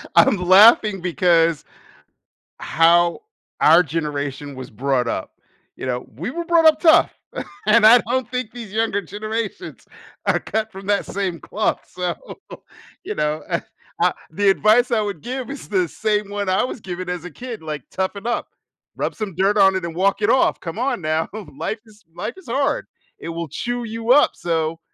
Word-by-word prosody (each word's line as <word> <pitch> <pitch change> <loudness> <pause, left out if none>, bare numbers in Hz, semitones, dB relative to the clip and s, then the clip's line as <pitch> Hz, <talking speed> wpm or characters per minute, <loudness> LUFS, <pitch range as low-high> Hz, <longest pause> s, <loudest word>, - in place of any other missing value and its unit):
I'm 210 - +5
laughing 195 +2 +6
because 170 -3 +2 1.0
how 170 +1 +3 0.4
our 165 +3 +7
generation 145 -3 -4
was 130 -1 -9
brought 125 +2 0
up. 95 - -4 0.4
You - - -6
know, 125 -1 -3
we 175 - -4
were 340 +4 -4
brought 335 -1 +4
up 310 -1 +5
tough, 320 -2 +5 0.5
and 215 0 +6
I 235 +3 +9
don't 250 -1 -1
think 250 -3 -3
these 230 -5 -9
younger 220 -2 0
generations 215 - -5 0.4
are - - +2
cut 220 0 -3
from 195 -1 -11
that 205 0 +1
same 185 -4 -3
cloth, 215 - -1
so, 180 0 -3 0.9
you 425 - -4
know. 150 +1 -1
Uh - - 0 0.4
uh, - - +4 0.2
the 200 +4 +1
advice 215 +6 +4
I 225 -3 +2
would 200 -6 -4
give 255 - -5
is 280 -1 -8
the 185 -4 +1
same 210 +3 -1
one 205 -1 -3
I 185 - +2
was 250 -2 -5
given 180 -1 -6
as 180 -1 -4
a 180 - -7
kid, 240 - -8
like, 155 -3 -5
"Toughen 190 +3 -3
up. 240 - -2 0.5
Rub - - -2
some 210 -4 -5
dirt 195 +4 +2
on 195 -1 +5
it 185 - -3
and 170 -1 -5
walk 195 +4 +1
it 210 - +3
off, 260 - +3
come 165 +5 -7
on 250 -7 -1
now. 155 +1 0 0.3
Life 215 +9 -4
is 215 -1 -20
life - - -4
is 380 - -15
hard. 275 +4 0 0.3
It - - -8
will 165 0 -4
chew 245 - -3
you 230 +1 0
up, 290 - +6
so 165 -1 -2
195 Hz, 180 wpm, -21 LUFS, 165-225 Hz, 1.0 s, I